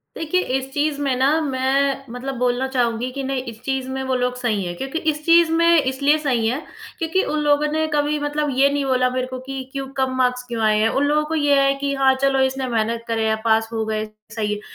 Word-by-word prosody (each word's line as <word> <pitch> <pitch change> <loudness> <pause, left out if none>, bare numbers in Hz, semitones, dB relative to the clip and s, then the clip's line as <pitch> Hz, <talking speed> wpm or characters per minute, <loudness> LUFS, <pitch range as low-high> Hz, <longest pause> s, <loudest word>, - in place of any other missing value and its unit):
देखिए 325 +3 0 0.2
इस 265 0 -7
चीज़ 290 0 0
में 275 -3 +1
ना 260 +2 +3
मैं 275 0 0
मतलब 260 +2 -5
बोलना 250 +1 0
चाहूँगी 245 -2 -1
कि 275 +1 -5
नहीं 270 -1 -2
इस 220 - -15
चीज़ 265 -1 -2
में 265 0 -3
वो 260 -1 -1
लोग 250 0 0
सही 225 -6 -1
हैं 175 0 -4
क्योंकि 270 - -3
इस 300 0 -3
चीज़ 335 -1 +5
में 335 -1 +4
इसलिए 280 +3 +2
सही 250 -7 0
हैं 255 +6 -1 0.4
क्योंकि 340 +3 +1
उन 305 - -1
लोगों 295 0 +3
ने 315 +1 +1
कभी 295 0 +1
मतलब 295 0 -1
ये 275 +1 +5
नहीं 285 0 -1
बोला 255 -1 +2
मेरे 255 0 -2
को 255 0 -6
कि 265 +1 -6
क्यों 275 -1 -4
कम 265 -1 0
मार्क्स 250 -1 +1
क्यों 235 -2 -4
आए 215 -1 +3
हैं? 220 +1 +3
उन 270 - 0
लोगों 300 +1 +2
को 320 +1 -3
ये 290 -2 +3
है 275 0 +3
कि 280 0 0
हाँ, 270 -1 +4
चलो 275 -1 +2
इसने 265 0 -1
मेहनत 230 0 -1
करे 225 -1 0
है 220 - +2
पास 225 0 +2
हो 220 -1 -1
गए, 215 0 -2 0.3
सही 210 -2 -1
है 210 - -4
265 Hz, 245 wpm, -21 LUFS, 250-290 Hz, 0.4 s, चीज़